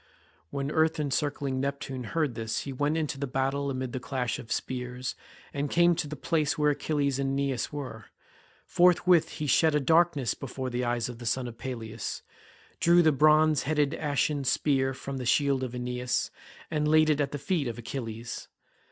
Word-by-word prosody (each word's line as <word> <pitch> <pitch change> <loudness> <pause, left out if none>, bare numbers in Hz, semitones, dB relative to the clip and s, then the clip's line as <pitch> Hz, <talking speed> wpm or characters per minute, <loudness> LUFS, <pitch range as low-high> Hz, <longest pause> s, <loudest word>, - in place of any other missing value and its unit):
When 140 - -3
earth 160 +1 +2
encircling 140 -2 -1
Neptune 135 -2 -3
heard 150 -1 0
this 110 -1 -3
he 140 - -5
went 145 +4 0
into 150 -3 -2
the 140 - -2
battle 135 +2 -1
amid 130 -2 -3
the 130 - -2
clash 125 -2 -2
of 115 - -10
spears, 125 0 -3 0.4
and 145 0 -2
came 175 +2 +4
to 155 - -2
the 150 - -5
place 155 0 0
where 150 -1 +3
Achilles 140 -2 0
and 135 0 0
Aeneas 135 -2 -1
were. 130 -7 -6 0.6
Forthwith 180 -1 +4
he 150 - -4
shed 155 +3 +4
a - - +4
darkness 160 -3 +3
before 130 -1 -5
the 125 +1 -1
eyes 120 -1 0
of 120 -1 -8
the 120 - -6
son 125 +2 0
of 115 -1 -9
Peleus, 115 -4 -5 0.6
drew 170 +1 +5
the 160 - +5
bronze 155 +1 +4
headed 150 0 +1
ashen 145 -2 0
spear 135 0 +1
from 135 +1 -6
the 125 - -4
shield 140 0 +3
of 125 -1 -4
Aeneas, 125 0 -2 0.4
and 150 -1 +1
laid 155 0 +5
it 150 -1 +1
at 140 - -1
the 145 - -3
feet 150 -1 -1
of 120 - -4
Achilles. 115 -1 -6
140 Hz, 185 wpm, -28 LUFS, 125-150 Hz, 0.6 s, drew